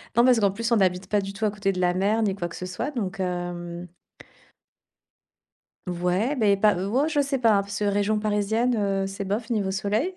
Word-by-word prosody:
Non, 235 - +5
parce 250 -3 +5
qu'en 200 -2 +3
plus, 230 +4 -3
on 235 - +5
n'habite 185 -1 +1
pas 205 -1 +2
du 195 0 -5
tout 220 +2 -2
à 210 - +1
côté 200 -1 -1
de 185 - -4
la 180 0 +2
mer 205 +4 +1
ni 200 - +1
quoi 175 -3 -3
que 170 - -10
ce 180 - -6
soit. 185 +10 -3
Donc, 200 -9 -4
hem 175 -1 -4 2.0
Ouais, 180 +9 0
beh 205 -5 +3
pas 210 +1 +4
ou 200 +8 -1
oh 300 - +2
je 295 -2 +1
sais 275 -1 -1
pas, 225 -3 +4
hein, 200 - +3
parce 200 +1 -6
que 210 - 0
région 205 +1 +1
parisienne, 215 +3 +1
heu, 195 -2 0
c'est 195 +1 -5
bof 210 +5 -3
niveau 200 -4 0
soleil. 215 - -1
200 Hz, 230 wpm, -25 LUFS, 190-225 Hz, 2.0 s, Non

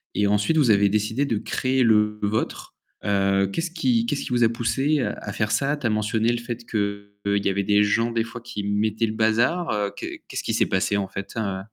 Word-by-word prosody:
Et 105 - +2
ensuite, 105 +10 +2
vous 130 -7 +4
avez 100 0 +4
décidé 105 +6 0
de 115 -6 -1
créer 130 +4 0
le 105 -2 +3
vôtre. 110 +2 -2 0.3
Heu, 100 -1 +2
qu'est-ce 165 0 -2
qui 230 +7 +1
qu'est-ce 235 - -2
qui - - -6
vous 120 -1 +2
a 115 - +5
poussés 130 +6 0
à - - -4
faire 105 -1 -1
ça? 145 +2 +1
Tu 140 - -7
as - - +1
mentionné 110 +2 +1
le 120 - -1
fait 120 0 -6
qu'il 100 -1 -2
y - - +3
avait 100 +1 0
des 105 +1 +4
gens 115 +3 +1
des 115 -1 0
fois 115 +1 -9
qui 120 -3 -6
mettaient 105 +2 0
le 110 - -3
bazar, 115 +11 +1
heu, 105 -1 -1
qu'est - - -7
qu'est-ce - - -5
qui - - -2
s'est - - +3
passé 95 +1 0
en 100 -1 -1
fait, 100 0 -7
heu? 100 -4 -2
110 Hz, 230 wpm, -24 LUFS, 100-120 Hz, 0.3 s, a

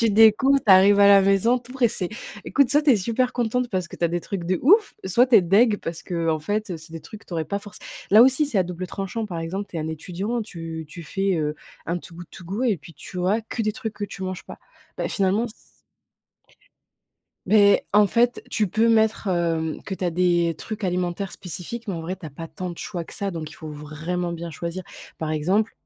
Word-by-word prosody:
Tu 230 - +3
découvres, 225 +6 +6
tu 200 - +7
arrives 200 +2 +7
à 200 - +7
la 200 -1 +8
maison, 195 +6 +3
tout 245 +1 -14
pressée. 235 -8 0 0.4
Écoute, 275 -3 +3
soit 295 +1 +4
tu 295 -2 +3
es 235 - +6
super 235 +5 0
contente, 245 +1 0
parce 185 -4 -2
que - - -10
tu 170 - -1
as - - +3
des 175 +1 -2
trucs 185 -1 -5
de 180 +1 0
ouf, 410 - +5
soit 235 +7 +4
tu 250 - +2
es 190 - +6
dégoutée 205 +5 +4
parce 165 -3 -6
que, 180 - -6
heu, 165 -1 +1
en 155 - -1
fait, 205 0 -2
c'est 160 +1 -10
des 165 - -6
trucs 215 - -11
que - - -22
tu 175 - -7
aurais 160 - -1
pas 200 +5 -2
forcé 205 0 -8 0.3
là 215 +3 +9
aussi, 265 +4 +4
c'est 255 -8 -3
à 190 - +5
double 180 +1 -5
tranchant, 195 +4 -4
par 175 -4 -5
exemple, 185 +5 -4
tu 170 - -8
es - - -1
un 155 - -3
étudiant, 185 +9 -3
tu 165 -6 -7
tu 170 +2 -9
fais, 195 +3 -1
heu, 150 -1 -1 0.3
un 170 +2 -2
Too 170 - -13
Good 175 -1 -9
To 185 - -12
Go 200 +8 -3
et 220 -9 +2
puis 160 +3 -14
tu 180 +5 -9
vois 200 +5 +1
que 230 - -5
des 215 -1 0
trucs 220 0 -5
que 205 0 -5
tu 190 - -9
manges 185 -1 -5
pas, - - -10 0.4
beh, - - -2
finalement, 200 +3 +1
c 225 - -9 1.9
beh, 205 -2 +5
en 210 0 +7
fait, 240 +3 +1
tu 210 -3 +1
peux 220 +5 +2
mettre, 220 -1 +2
hem, 165 -3 -1
que 195 - -5
tu 185 - -5
as 175 - +1
des 175 -1 +2
trucs 215 -2 -6
alimentaires 180 +1 -2
spécifiques, 190 +6 -7
mais 195 - -1
en 165 - -5
vrai 180 +3 -3
tu 185 -4 -10
as - - -8
pas 165 +4 -8
tant 185 -3 -6
de 170 - -7
choix 175 -5 -5
que - - -10
ça, 200 -2 -2
donc 160 -3 -5
il - - -12
faut 155 -2 -9
vraiment 155 +4 -4
bien 170 0 -6
choisir. 170 +3 -5 0.3
Par 160 -1 -3
exemple, 185 +9 +1
190 Hz, 250 wpm, -24 LUFS, 170-220 Hz, 1.9 s, là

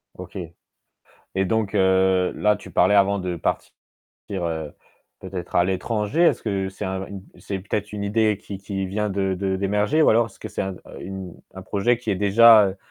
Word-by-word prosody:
OK - - -9 1.0
et 95 0 +1
donc 105 +1 -1
heu, 95 -1 +3
là 105 0 +2
tu 95 -2 -12
parlais 90 +4 +4
avant 100 0 +4
de 90 -2 -3
partir, - - -2 0.6
heu, 80 -6 -3 0.5
peut-être 90 -3 -6
à 90 - +5
l'étranger, 105 - -1
est-ce 170 - +3
que 100 -3 -1
c'est 95 - -7
un 95 0 -3
une 100 -1 -8 0.2
c'est 100 - -5
peut-être 105 +2 -4
une 105 -1 -4
idée 105 0 +1
qui 100 - -8
qui 95 -1 -4
vient 105 +2 -2
de 95 -1 0
de 95 0 -1
d'émerger? 105 +9 +1
Ou - - +5
alors, 115 +1 +4
est-ce 105 - -16
que - - -7
c'est - - -3
un 95 0 -4 0.3
une 95 -1 -7 0.2
un 95 - -8
projet 105 +5 +1
qui 115 -3 -4
est - - +2
déjà, 110 +3 +7
heu 95 - -6
100 Hz, 195 wpm, -23 LUFS, 95-105 Hz, 1.0 s, déjà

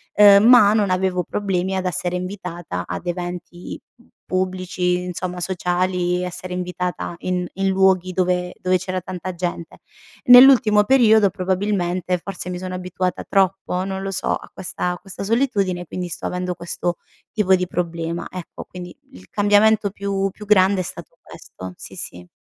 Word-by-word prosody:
uhm, 205 -1 +8
ma 235 -4 +7
non 210 -3 +2
avevo 185 -1 0
problemi 190 0 -2
ad 190 0 -2
essere 180 0 -2
invitata 180 - -5
ad 90 0 -5
eventi 175 0 -6 0.5
pubblici, 185 -1 -1
insomma, 180 0 -5
sociali, 180 0 -1
essere 180 0 -6
invitata 180 -1 -4
in 180 -1 -2
in 195 +1 -1
luoghi 190 -1 +3
dove 180 -1 0
dove 185 0 +2
c'era 185 +1 -3
tanta 185 +1 -6
gente. 175 -1 -5 0.5
Nell'ultimo 245 -4 +8
periodo, 220 -4 +5
probabilmente 185 -1 -1
forse 180 -1 -7
mi 180 - -4
sono 185 0 -6
abituata 180 0 -3
troppo, 190 -1 0
non 190 0 -4
lo 195 - -3
so 195 - -1
a - - -10
questa 180 -1 -3
questa 195 0 -8
solitudine 200 -6 0
quindi, 180 +1 -5
sto 170 - -6
avendo 180 0 -3
questo 175 0 -3 0.3
tipo 190 -3 +3
di 180 0 -2
problema 170 -1 -3
ecco, 180 -2 -8
quindi, 180 -1 -9 0.2
il 90 +1 -15
cambiamento 205 0 +3
più 195 -1 -2
più 210 - -11
grande 195 -2 +4
è - - -3
stato 170 -1 -9
questo, 95 0 -10
sì - - -11
sì. 90 0 -7
185 Hz, 155 wpm, -21 LUFS, 180-195 Hz, 0.5 s, uhm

